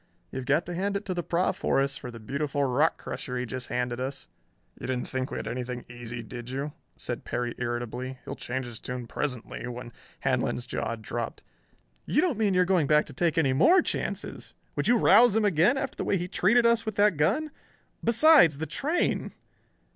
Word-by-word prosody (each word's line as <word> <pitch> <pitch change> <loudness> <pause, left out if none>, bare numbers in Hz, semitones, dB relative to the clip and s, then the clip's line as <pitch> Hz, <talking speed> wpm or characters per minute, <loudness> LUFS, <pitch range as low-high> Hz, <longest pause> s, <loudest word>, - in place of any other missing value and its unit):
You've 130 -1 -5
got 150 +4 +2
to 175 - -5
hand 200 +3 -1
it 205 - -8
to 185 - -2
the 175 - -2
Proff, 175 +3 0
Horace, 135 0 +1
for 125 - -7
the 120 -1 -9
beautiful 140 +5 -2
rock 140 +5 +2
crusher 125 -2 -5
he 125 - -2
just 125 +1 -5
handed 125 0 -2
us." 135 +2 -4 0.5
"You - - -6
didn't 125 -1 -2
think 130 0 -3
we - - -4
had - - -5
anything 125 0 -4
easy, 120 0 -7
did 120 +2 -8
you?" 140 +3 -3 0.3
said - - -5
Perry 120 -1 -2
irritably. 120 +2 -3
"He'll - - -4
change 130 +1 -4
his 120 -2 -8
tune 125 -1 -5
presently, 125 -1 -4
when 120 -1 -7 0.2
" - - -29
Handlon's 120 - 0
jaw 115 -2 -3
dropped. 115 +1 -5 0.6
"You - - +2
don't 320 - +1
mean 205 -4 +2
you're 180 0 +4
going 180 -5 +2
to 150 +1 +5
take 170 -2 0
any 140 -5 +3
more 335 - +5
chances! - - -4 0.2
Would - - 0
you 240 - +5
rouse 235 0 +6
him 220 -1 +3
again 200 - +4
after 270 -1 -3
the - - -2
way 195 - +1
he 175 0 -3
treated 225 +7 +3
us 235 -1 +4
with 220 -2 -4
that 205 -2 +4
gun? 195 - +1 0.5
Besides, 235 - +6
the 160 - -3
train...." 310 - -1
140 Hz, 200 wpm, -28 LUFS, 125-195 Hz, 0.6 s, rouse